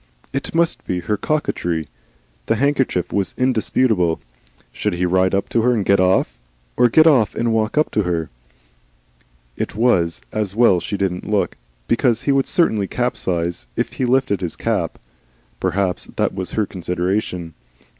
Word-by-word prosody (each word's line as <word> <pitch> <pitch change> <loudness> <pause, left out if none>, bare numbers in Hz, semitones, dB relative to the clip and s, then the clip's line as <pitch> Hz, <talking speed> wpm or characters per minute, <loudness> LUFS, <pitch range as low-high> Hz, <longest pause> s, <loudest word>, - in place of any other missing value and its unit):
It 135 +3 -3
must 170 0 +1
be 90 -1 -1
her 95 +5 -1
coquetry 90 - -1 0.6
the 115 - +2
handkerchief 130 - 0
was 100 -3 -1
indisputable. 110 -8 +1 0.5
Should - - -2
he 90 +1 0
ride 95 +1 +2
up 100 - 0
to 115 - +2
her 125 +2 +3
and 105 -4 -1
get 100 -1 +4
off, 90 -10 +2 0.4
or 120 - +4
get 155 +7 +6
off 130 -10 +4
and 115 -1 0
ride 110 +4 0
up 150 - +2
to 105 - +1
her? 85 -6 -2 1.2
It - - -4
was 85 - +2
as 105 -2 -2
well 110 -6 +5
she 100 +3 -4
didn't 95 -1 -2
look, 105 -2 0 0.3
because 120 -1 +2
he 140 - +2
would 135 -1 +2
certainly 110 - +2
capsize 90 - -2
if - - -2
he 130 - -1
lifted 125 -6 +1
his 85 -3 -3
cap. - - -1 0.6
Perhaps 95 -2 -1
that - - 0
was 95 -1 -5
her 110 - +1
consideration. 90 -1 -2
100 Hz, 160 wpm, -20 LUFS, 90-120 Hz, 1.2 s, get